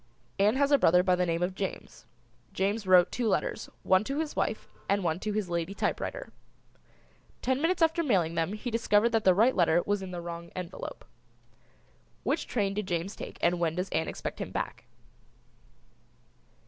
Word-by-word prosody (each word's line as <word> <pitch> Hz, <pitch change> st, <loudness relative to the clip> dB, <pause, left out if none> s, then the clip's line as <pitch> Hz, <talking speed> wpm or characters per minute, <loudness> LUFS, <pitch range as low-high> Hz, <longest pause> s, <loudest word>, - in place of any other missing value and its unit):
Ann 210 Hz, +4 st, +4 dB
has 280 Hz, +1 st, +2 dB
a 285 Hz, -, +6 dB
brother 180 Hz, +2 st, +5 dB
by 185 Hz, -1 st, +3 dB
the 180 Hz, 0 st, 0 dB
name 165 Hz, +1 st, 0 dB
of 180 Hz, +1 st, -1 dB
James. 195 Hz, 0 st, -6 dB, 0.5 s
James 200 Hz, +2 st, -1 dB
wrote 180 Hz, -1 st, +6 dB
two 240 Hz, -2 st, -1 dB
letters, 205 Hz, -, -1 dB
one 185 Hz, +1 st, +4 dB
to 275 Hz, +4 st, -3 dB
his 310 Hz, -1 st, -2 dB
wife -, -, -1 dB, 0.2 s
and 200 Hz, -1 st, +2 dB
one 165 Hz, 0 st, 0 dB
to 215 Hz, -, -3 dB
his 210 Hz, -2 st, -1 dB
lady 170 Hz, +2 st, -2 dB
typewriter. -, -, -3 dB, 1.1 s
Ten 260 Hz, +1 st, +1 dB
minutes 335 Hz, +1 st, +2 dB
after 325 Hz, +1 st, +3 dB
mailing 185 Hz, -, +1 dB
them 165 Hz, +3 st, -1 dB
he 235 Hz, +3 st, -5 dB
discovered 225 Hz, -1 st, +3 dB
that 225 Hz, -2 st, 0 dB
the 185 Hz, -1 st, +6 dB
right 230 Hz, +6 st, +4 dB
letter 170 Hz, -1 st, +4 dB
was 205 Hz, -1 st, 0 dB
in 190 Hz, -, -6 dB
the 180 Hz, -1 st, -5 dB
wrong 170 Hz, 0 st, -7 dB
envelope. 180 Hz, -1 st, -7 dB, 1.2 s
Which -, -, -1 dB
train 200 Hz, -4 st, 0 dB
did 205 Hz, -1 st, -3 dB
James 175 Hz, +3 st, -2 dB
take -, -, -8 dB
and 175 Hz, 0 st, +3 dB
when 165 Hz, -2 st, 0 dB
does 180 Hz, +2 st, -2 dB
Ann 160 Hz, -, -1 dB
expect -, -, -5 dB
him -, -, -4 dB
back? -, -, -4 dB
195 Hz, 185 wpm, -29 LUFS, 175-225 Hz, 1.2 s, a